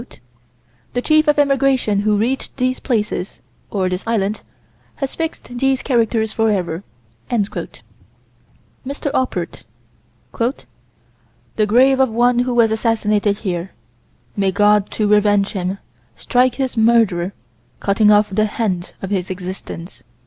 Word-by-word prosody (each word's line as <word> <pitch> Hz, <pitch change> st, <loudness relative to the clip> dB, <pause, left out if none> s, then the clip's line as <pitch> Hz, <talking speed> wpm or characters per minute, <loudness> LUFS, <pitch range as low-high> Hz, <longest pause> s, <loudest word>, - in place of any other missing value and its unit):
Maurice 240 Hz, -, -14 dB
Schwab: 120 Hz, +1 st, -33 dB, 0.6 s
"The 245 Hz, -, 0 dB
chief 310 Hz, 0 st, +3 dB
of 295 Hz, -, +3 dB
Emigration 275 Hz, -7 st, +2 dB
who 210 Hz, 0 st, +2 dB
reached 250 Hz, +7 st, -2 dB
these 255 Hz, 0 st, 0 dB
places 210 Hz, -6 st, -2 dB, 0.3 s
(or 190 Hz, -3 st, 0 dB
this 180 Hz, +1 st, -3 dB
island) 215 Hz, -2 st, 0 dB, 0.5 s
has 275 Hz, -1 st, -4 dB
fixed 315 Hz, -7 st, -5 dB
these 270 Hz, 0 st, +1 dB
characters 225 Hz, -3 st, +1 dB
forever." 195 Hz, -6 st, 0 dB, 0.5 s
M. 225 Hz, -4 st, +1 dB, 1.7 s
Oppert: 260 Hz, 0 st, -2 dB, 1.9 s
"The 215 Hz, -1 st, +2 dB
grave 260 Hz, +5 st, +4 dB
of 265 Hz, -1 st, +4 dB
one 240 Hz, +2 st, +2 dB
who 245 Hz, 0 st, 0 dB
was 230 Hz, -2 st, +4 dB
assassinated 215 Hz, -2 st, +1 dB
here. 180 Hz, 0 st, -3 dB, 0.6 s
May 195 Hz, -1 st, +1 dB
God, 205 Hz, +1 st, +3 dB
to 215 Hz, -, -1 dB
revenge 205 Hz, -1 st, +3 dB
him, 190 Hz, 0 st, -3 dB, 0.4 s
strike 250 Hz, 0 st, +1 dB
his 265 Hz, -1 st, -2 dB
murderer, 220 Hz, -6 st, +3 dB, 0.5 s
cutting 210 Hz, +1 st, +3 dB
off 210 Hz, 0 st, +4 dB
the 215 Hz, +2 st, +2 dB
hand 205 Hz, -5 st, -2 dB
of 195 Hz, -, -4 dB
his 185 Hz, -3 st, -1 dB
existence." 185 Hz, -1 st, -7 dB
215 Hz, 125 wpm, -19 LUFS, 200-245 Hz, 1.9 s, grave